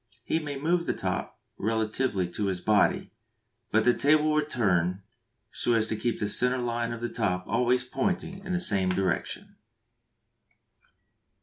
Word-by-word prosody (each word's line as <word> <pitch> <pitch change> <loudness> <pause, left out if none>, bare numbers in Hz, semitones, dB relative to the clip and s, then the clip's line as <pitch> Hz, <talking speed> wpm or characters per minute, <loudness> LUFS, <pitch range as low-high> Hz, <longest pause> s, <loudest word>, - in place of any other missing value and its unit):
He 160 - 0
may 145 -3 -5
move 170 +4 0
the - - 0
top 90 -2 -3 0.2
relatively 110 -2 0
to 100 +3 -2
his 95 -2 -1
body, 105 +3 +2 0.6
but 110 0 +3
the 125 - +5
table 155 +3 +3
will 150 0 +2
turn 95 - 0 0.5
so 120 - 0
as 110 -1 +3
to - - 0
keep 115 +2 -1
the 105 - 0
centre 125 +4 +2
line 120 -1 -2
of 115 0 -6
the 120 - -1
top 90 -6 -1
always 125 +3 +2
pointing 190 +6 -2
in 190 - -5
the 180 - +1
same 100 - +1
direction. 95 -1 -2
115 Hz, 160 wpm, -28 LUFS, 100-140 Hz, 0.6 s, the